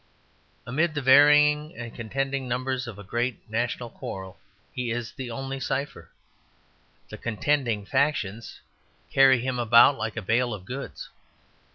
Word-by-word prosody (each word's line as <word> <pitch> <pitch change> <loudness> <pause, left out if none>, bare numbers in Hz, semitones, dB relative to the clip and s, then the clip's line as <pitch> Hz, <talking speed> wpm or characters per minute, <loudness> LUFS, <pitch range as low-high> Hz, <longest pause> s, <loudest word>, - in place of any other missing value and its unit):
Amid 155 +6 0
the 145 - -1
varying 150 +3 +5
and 115 -1 -7
contending 135 +3 -3
numbers 130 +1 -2
of 115 -4 -8
a 105 - -10
great 120 +5 -3
national 120 +1 -3
quarrel, 95 0 -8 0.3
he 125 -3 -3
is 115 0 -3
the 130 -3 -7
only 135 +3 -5
cipher. 135 +2 -4 1.0
The - - -9
contending 115 -2 -1
factions 115 -6 -1 0.5
carry 135 -2 +5
him 130 0 -2
about 120 +4 +6
like 110 0 -4
a 115 - -3
bale 120 +3 +1
of 95 -3 -12
goods. 135 +6 -7
125 Hz, 140 wpm, -26 LUFS, 115-135 Hz, 1.0 s, about